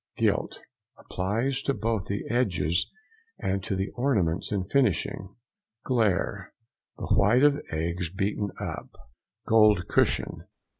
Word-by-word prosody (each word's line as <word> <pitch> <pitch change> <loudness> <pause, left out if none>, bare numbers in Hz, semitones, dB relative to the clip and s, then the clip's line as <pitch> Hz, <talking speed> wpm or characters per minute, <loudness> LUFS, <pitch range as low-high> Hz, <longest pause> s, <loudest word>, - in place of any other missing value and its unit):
GILT.—Applies 115 +9 -2
to 140 0 -1
both 110 -1 -1
the 100 0 -2
edges 90 -9 +1 0.5
and 95 0 -2
to 95 - -2
the 95 +1 -2
ornaments 105 -11 0
in 100 -3 0
finishing. 100 - 0 0.5
GLAIRE.—The 110 -1 -2
white 115 +7 +4
of 145 0 +4
eggs 85 +2 -2
beaten 100 +2 -1
up. - - -5 0.6
GOLD 110 -5 +4
CUSHION. - - 0
100 Hz, 105 wpm, -27 LUFS, 95-115 Hz, 0.6 s, white